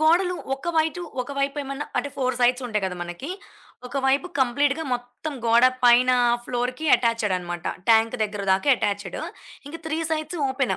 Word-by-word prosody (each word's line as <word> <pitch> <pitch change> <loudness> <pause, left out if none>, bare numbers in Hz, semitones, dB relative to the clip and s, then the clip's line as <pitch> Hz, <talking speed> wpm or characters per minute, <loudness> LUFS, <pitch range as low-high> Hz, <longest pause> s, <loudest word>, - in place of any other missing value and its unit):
గోడలు 355 +3 +3 0.2
ఒక 270 +5 -7
వైటు 320 +2 +1 0.2
ఒక 250 - -8
వైపు 275 +1 0
ఏమైనా 275 +1 -5
అంటే 285 - -1
4 255 -2 0
సైడ్స్ 250 +1 +3
ఉంటాయి 210 -4 -1
కదా! 185 -1 -3
మనకి. 175 - -6 0.6
ఒక 250 +3 -6
వైపు 275 +6 +2
కంప్లీట్‌గా 285 +5 +1
మొత్తం 245 +5 -6
గోడ 230 +2 +5 0.2
పైన 245 +1 +6 0.4
ఫ్లోర్‌కి 250 +5 -2
అటాచ్డ్ 230 -5 0
అన్నమాట. 175 -1 -6 0.3
ట్యాంక్ 225 +2 +4
దగ్గర 205 -1 -5
దాకా 190 +9 +2
అటాచ్డ్. 205 -2 -2 0.5
ఇంకా 330 +3 -8
3 320 0 -1
సైడ్స్ 310 +2 -2
ఓపెన్. 265 0 0
255 Hz, 160 wpm, -24 LUFS, 230-290 Hz, 0.6 s, పైన